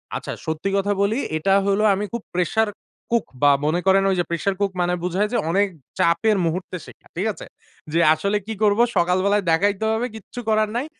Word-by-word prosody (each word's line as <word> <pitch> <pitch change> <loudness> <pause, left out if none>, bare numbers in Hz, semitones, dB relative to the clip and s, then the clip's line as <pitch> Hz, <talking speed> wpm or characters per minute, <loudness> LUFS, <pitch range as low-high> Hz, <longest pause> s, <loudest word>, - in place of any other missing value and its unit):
আচ্ছা। - - -5
সত্যি 160 +5 -2
কথা 205 +1 +1
বলি। 205 +3 +1 0.2
এটা 195 +5 +1
হলো 200 +2 +2
আমি 205 +2 -2
খুব 235 - -3
প্রেশার 220 +5 +1 0.4
কুক 235 -2 +2 0.2
বা 145 - +7
মনে 160 +4 +1
করেন 195 0 +5
ঐ - - +2
যে - - +2
প্রেশার 170 +4 -1
কুক 200 -1 +1
মানে 175 0 +1
বুঝায় 185 +4 0
যে - - +2
অনেক 200 +4 +2 0.3
চাপের 195 +5 +3
মুহূর্তে 180 +3 -3
শেখা। - - -16
ঠিক 180 +5 -2
আছে? - - -10 0.5
জি 165 - +1
আসলে 200 +6 0
কি 225 - -3
করবো? 210 +2 +4 0.2
সকাল 180 +1 +2
বেলায় 200 0 +2
দেখাইতে 200 +5 +1
হবে 240 +3 -1
কিচ্ছু 220 +3 -9
করার 215 0 +2
নাই। 250 +4 -1
195 Hz, 200 wpm, -22 LUFS, 175-210 Hz, 0.5 s, বা